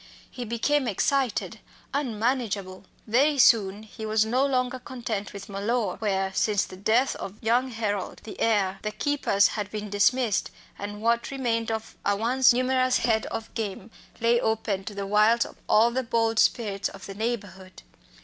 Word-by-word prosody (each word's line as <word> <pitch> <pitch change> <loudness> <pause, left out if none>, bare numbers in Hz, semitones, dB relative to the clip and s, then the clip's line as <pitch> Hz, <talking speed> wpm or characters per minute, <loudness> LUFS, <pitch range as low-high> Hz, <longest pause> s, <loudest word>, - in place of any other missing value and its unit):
He 250 -2 -6
became 245 +5 0
excited, 260 +3 0 0.3
unmanageable. 220 -7 -2 0.2
Very 275 +7 +3
soon 210 -5 +4
he 220 +1 -10
was 215 0 +2
no 250 +4 +1
longer 255 -2 0
content 235 -5 -5
with 200 -1 -9
Mellor, 205 0 -1
where, 195 -3 -1
since 205 0 +1
the - - -11
death 220 +7 +2
of 195 - -7
young 240 +3 +1
Harold, 210 -5 -3
the 220 - -9
heir, 195 -4 +1
the 215 - -2
keepers 215 -4 +2
had 205 -1 -4
been 210 -1 -6
dismissed, 215 +2 +2 0.3
and 205 +1 -6
what 235 +1 +1
remained 235 -4 -1
of 220 0 -4
a 205 - +2
once 245 +5 +4
numerous 255 +1 +2
head 225 -2 +1
of 225 - -6
game 215 -1 -5 0.3
lay 235 +1 +3
open 215 -3 -1
to 210 - -7
the 200 0 -3
wiles 215 +3 +4
of - - -12
all 225 +3 +5
the 260 +2 0
bold 230 -2 0
spirits 205 -4 +1
of 195 0 -11
the 195 - -7
neighbourhood. 200 -4 -5
220 Hz, 165 wpm, -26 LUFS, 205-245 Hz, 0.3 s, all